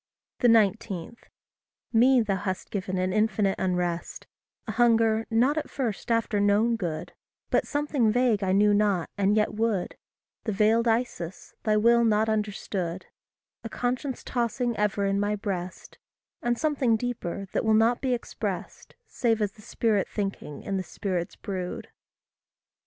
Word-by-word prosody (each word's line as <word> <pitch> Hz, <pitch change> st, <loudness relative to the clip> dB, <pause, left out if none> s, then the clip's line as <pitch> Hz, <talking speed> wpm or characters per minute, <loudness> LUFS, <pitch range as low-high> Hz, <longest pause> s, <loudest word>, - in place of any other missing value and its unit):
19. 215 Hz, -4 st, +2 dB, 0.8 s
Me 250 Hz, +2 st, +5 dB
thou 200 Hz, -3 st, 0 dB
hast 190 Hz, -1 st, -4 dB
given 190 Hz, -2 st, -3 dB
an 185 Hz, 0 st, 0 dB
infinite 215 Hz, -2 st, +2 dB
unrest, 180 Hz, -2 st, -2 dB, 0.4 s
A 220 Hz, -, -3 dB
hunger 225 Hz, -1 st, +3 dB
not 250 Hz, +7 st, +3 dB
at -, -, -7 dB
first 240 Hz, -7 st, -3 dB
after 230 Hz, -2 st, +1 dB
known 205 Hz, +3 st, +3 dB
good, 170 Hz, -7 st, -4 dB, 0.4 s
But -, -, +2 dB
something 290 Hz, -6 st, +1 dB
vague 235 Hz, -3 st, +2 dB
I 185 Hz, -, +1 dB
knew 205 Hz, +2 st, +4 dB
not, 205 Hz, -4 st, +1 dB
and 200 Hz, +1 st, +2 dB
yet 210 Hz, -, +1 dB
would 215 Hz, -4 st, -1 dB, 0.5 s
The 215 Hz, -, -1 dB
veiled 220 Hz, +4 st, +3 dB
Isis, 225 Hz, -7 st, -2 dB
thy 215 Hz, -1 st, +3 dB
will 235 Hz, +2 st, +5 dB
not 220 Hz, -1 st, +2 dB
understood; 195 Hz, -4 st, -2 dB, 0.6 s
A 225 Hz, -, -5 dB
conscience 250 Hz, +3 st, -2 dB
tossing 240 Hz, 0 st, -1 dB
ever 205 Hz, -1 st, 0 dB
in 195 Hz, 0 st, +1 dB
my 205 Hz, +1 st, 0 dB
breast; 190 Hz, -3 st, -5 dB, 0.4 s
And 240 Hz, 0 st, 0 dB
something 275 Hz, -6 st, +2 dB
deeper, 215 Hz, -5 st, -4 dB
that -, -, 0 dB
will 220 Hz, -1 st, +3 dB
not 230 Hz, +2 st, +3 dB
be 255 Hz, -2 st, +1 dB
expressed, 240 Hz, -, -6 dB
Save 230 Hz, -2 st, 0 dB
as 205 Hz, -2 st, 0 dB
the 210 Hz, -, -18 dB
Spirit 210 Hz, -2 st, 0 dB
thinking 195 Hz, -7 st, -4 dB
in 195 Hz, -1 st, -2 dB
the 190 Hz, -, -2 dB
Spirit's 180 Hz, -3 st, -3 dB
brood. 185 Hz, -3 st, -5 dB
215 Hz, 145 wpm, -27 LUFS, 195-235 Hz, 0.8 s, Me